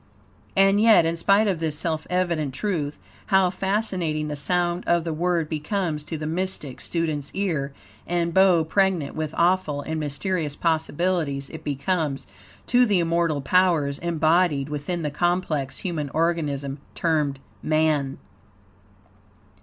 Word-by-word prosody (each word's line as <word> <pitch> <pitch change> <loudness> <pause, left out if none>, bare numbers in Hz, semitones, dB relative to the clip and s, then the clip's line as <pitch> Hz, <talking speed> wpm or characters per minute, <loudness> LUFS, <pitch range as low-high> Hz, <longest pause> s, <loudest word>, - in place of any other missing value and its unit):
And 195 +1 +4
yet, 220 -7 +6
in 165 +1 0
spite 200 +5 +3
of 185 -5 0
this 155 -2 -1
self 160 -1 -2
evident 170 -7 0
truth, 155 -5 -2 0.3
how 190 -3 +4
fascinating 185 -6 -1
the 150 - -3
sound 175 +4 0
of 170 -1 +3
the 165 -1 -3
word 170 0 0
becomes 155 0 -2
to 160 - -4
the 155 - -5
mystic 165 -5 -3
student's 155 -4 -2
ear, 165 -8 -1 0.4
and 170 -1 0
bow 185 -3 +5
pregnant 180 -3 +1
with 155 0 -3
awful 170 -4 +2
and 160 +1 -3
mysterious 150 +1 -2
possibilities 160 -3 -1
it 160 -1 -9
becomes, 145 0 -1 0.4
to 245 0 +4
the 205 -3 +3
immortal 165 -3 +1
powers 155 -3 +2
embodied 160 -3 +2
within 150 +4 -3
the 150 - -2
complex 170 -4 -1
human 160 -6 -3
organism 150 -4 -1 0.2
termed 150 -5 0 0.2
man. 155 -3 +1
165 Hz, 135 wpm, -24 LUFS, 150-180 Hz, 0.4 s, yet